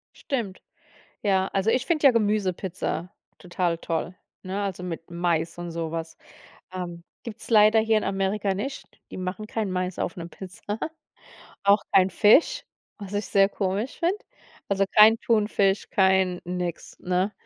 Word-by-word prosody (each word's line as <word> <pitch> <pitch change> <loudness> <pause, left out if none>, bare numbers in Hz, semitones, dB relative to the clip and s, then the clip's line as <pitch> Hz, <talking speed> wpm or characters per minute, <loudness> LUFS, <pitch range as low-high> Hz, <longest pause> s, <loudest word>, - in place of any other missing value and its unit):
Stimmt. 235 - -4 0.6
Ja, 190 -2 +2
also 195 +3 +1
ich 255 +2 +1
finde 310 -4 +2
ja - - +9
Gemüsepizza 190 -5 -1 0.3
total 175 -2 -1
toll, 165 +2 -3 0.3
ne, 195 +2 -3
also 190 -3 -4
mit 165 -2 -6
Mais 170 -1 -1
und 175 0 -5
so 165 -1 -3
was 165 0 -5 0.6
ähm, 175 -2 -6 0.2
gibt's 230 0 -8
leider 215 0 +6
hier 220 0 +3
in - - -4
Amerika 195 +1 0
nicht, 265 +8 -6
die - - -8
machen 185 +3 -4
kein 215 -2 -2
Mais 185 0 -2
auf - - -2
'ne 170 -1 -6
Pizza, 190 +4 -7 0.9
auch 200 +1 +5
kein 185 -1 +6
Fisch, 290 - +4 0.3
was 200 -2 -8
ich 205 0 -1
sehr 195 -1 +4
komisch 200 +5 -2
find. 345 +3 +1 0.5
Also, 195 0 +2
kein 220 +1 +8
Thunfisch, 210 -3 +1
kein 190 -2 +3
nix, 180 -1 -5
ne? 185 +3 0
195 Hz, 150 wpm, -25 LUFS, 180-215 Hz, 0.9 s, ja